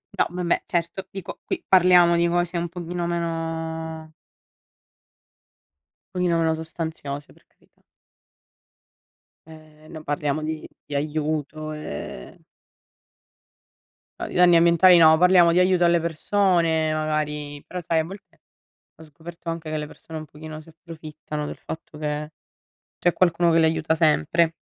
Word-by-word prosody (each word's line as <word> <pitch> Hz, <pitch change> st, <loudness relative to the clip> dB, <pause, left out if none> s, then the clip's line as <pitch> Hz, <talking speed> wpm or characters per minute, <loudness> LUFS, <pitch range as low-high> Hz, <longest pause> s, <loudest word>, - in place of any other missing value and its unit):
No -, -, +2 dB
vabbè, 175 Hz, -1 st, -1 dB
certo, 175 Hz, +2 st, -2 dB
dico 195 Hz, -2 st, -8 dB
qui 355 Hz, -2 st, -4 dB
parliamo 180 Hz, -2 st, +6 dB
di 170 Hz, 0 st, +2 dB
cose 175 Hz, 0 st, 0 dB
un 170 Hz, 0 st, -2 dB
pochino 175 Hz, 0 st, -4 dB
meno 160 Hz, -1 st, -4 dB, 2.0 s
pochino 180 Hz, -2 st, +1 dB
meno 165 Hz, -1 st, +2 dB
sostanziose, 160 Hz, -3 st, -6 dB
per -, -, -27 dB
carità. -, -, -34 dB, 1.7 s
Ehm, 155 Hz, -1 st, -16 dB
non 155 Hz, -1 st, -9 dB
parliamo 145 Hz, 0 st, -2 dB
di 155 Hz, 0 st, -4 dB, 0.2 s
di 145 Hz, -, -6 dB
aiuto, 155 Hz, +1 st, -2 dB
e 75 Hz, -, -8 dB, 1.8 s
No, -, -, -4 dB
di -, -, -9 dB
danni 175 Hz, -1 st, +6 dB
ambientali 170 Hz, +2 st, +6 dB
no, 160 Hz, -1 st, +7 dB
parliamo 180 Hz, 0 st, +6 dB
di 170 Hz, -, +1 dB
aiuto 180 Hz, -1 st, +3 dB
alle 170 Hz, 0 st, +4 dB
persone 165 Hz, -1 st, +1 dB
magari, 150 Hz, -2 st, -3 dB
però 180 Hz, -, -6 dB
sai 165 Hz, -1 st, 0 dB
a -, -, +1 dB
volte 190 Hz, +4 st, -12 dB, 0.6 s
ho -, -, -15 dB
scoperto 165 Hz, +2 st, -9 dB
anche 165 Hz, -1 st, -6 dB
che 155 Hz, -, -2 dB
le 150 Hz, -1 st, -3 dB
persone 160 Hz, +1 st, -10 dB
un 155 Hz, -, -7 dB
pochino 155 Hz, +1 st, -10 dB
si 165 Hz, -, -17 dB
approfittano 155 Hz, -2 st, -8 dB
del -, -, -7 dB
fatto 160 Hz, -1 st, -9 dB
che 150 Hz, 0 st, -4 dB, 0.7 s
c'è 175 Hz, -, +2 dB
qualcuno 175 Hz, -1 st, +3 dB
che 165 Hz, -, +4 dB
l'aiuta 160 Hz, -1 st, +2 dB
sempre. 160 Hz, -, +2 dB
160 Hz, 135 wpm, -23 LUFS, 155-170 Hz, 2.0 s, no